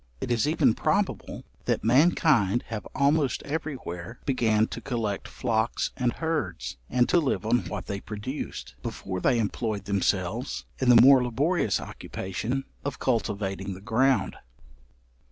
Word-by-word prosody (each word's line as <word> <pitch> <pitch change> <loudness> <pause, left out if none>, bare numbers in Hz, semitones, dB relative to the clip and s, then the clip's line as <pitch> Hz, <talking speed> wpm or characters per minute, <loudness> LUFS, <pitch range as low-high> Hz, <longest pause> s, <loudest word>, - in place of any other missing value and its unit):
It - - -3
is 120 +3 +2
even 150 -7 +3
probable, - - -1 0.2
that - - 0
mankind 120 - +4
have 110 -2 -5
almost 140 0 +2
every 150 0 -3
where 90 0 -7
began 110 -5 +2
to - - -6
collect 115 -6 -2
flocks 115 -2 -1
and 125 -2 0
herds, 90 - -3
and 125 -1 +3
to 175 - +4
live 140 -8 -1
on 120 +2 +3
what - - -5
they 100 - -4
produced, 105 - -6
before 95 +7 -4
they 125 - +3
employed 110 -2 -2
themselves 100 +4 -1
in 130 - +2
the 120 -1 +9
more 130 +1 +8
laborious 130 - +1
occupation 115 +8 -4 0.2
of 140 -1 -3
cultivating 100 -5 -1
the - - -10
ground. 130 +6 +2
115 Hz, 140 wpm, -27 LUFS, 100-135 Hz, 0.2 s, the